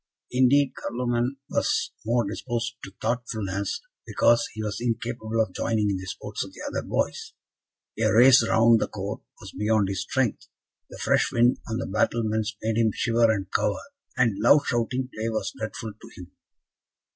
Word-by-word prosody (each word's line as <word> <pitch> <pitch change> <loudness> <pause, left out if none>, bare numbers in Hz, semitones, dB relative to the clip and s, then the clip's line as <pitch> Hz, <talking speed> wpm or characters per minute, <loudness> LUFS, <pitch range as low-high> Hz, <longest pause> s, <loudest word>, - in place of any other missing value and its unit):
Indeed, 130 +2 +4
Carloman 120 +2 -2
was - - 0
more 115 0 +1
disposed 115 +2 -3
to 95 - -8
thoughtfulness, 110 - -2 0.3
because 120 0 +3
he 110 - -6
was 105 +1 -4
incapable 115 -1 -2
of 110 -5 +1
joining 105 -1 0
in 95 - -1
the 95 0 -8
sports 90 - -5
of - - -11
the - - -11
other - - -2
boys. - - -2 0.7
A - - +3
race 125 +3 +7
round 115 0 +5
the - - 0
court 100 +1 -5 0.2
was 95 -3 -10
beyond 105 -2 +1
his 95 -2 -2
strength, 130 -5 -1 0.4
the - - -10
fresh - - +2
wind 120 +1 +3
on 110 - -1
the - - -3
battlements 110 +1 0
made 110 0 0
him 115 -1 +4
shiver 115 +1 +2
and 95 -3 -3
cower, 105 - +1 0.4
and 115 -6 +2
loud 140 +7 +5
shouting 125 +2 -1
play 110 +1 -2
was 110 -1 -2
dreadful 110 0 -5
to 105 - -15
him. 90 -1 -11
115 Hz, 170 wpm, -25 LUFS, 105-120 Hz, 0.7 s, race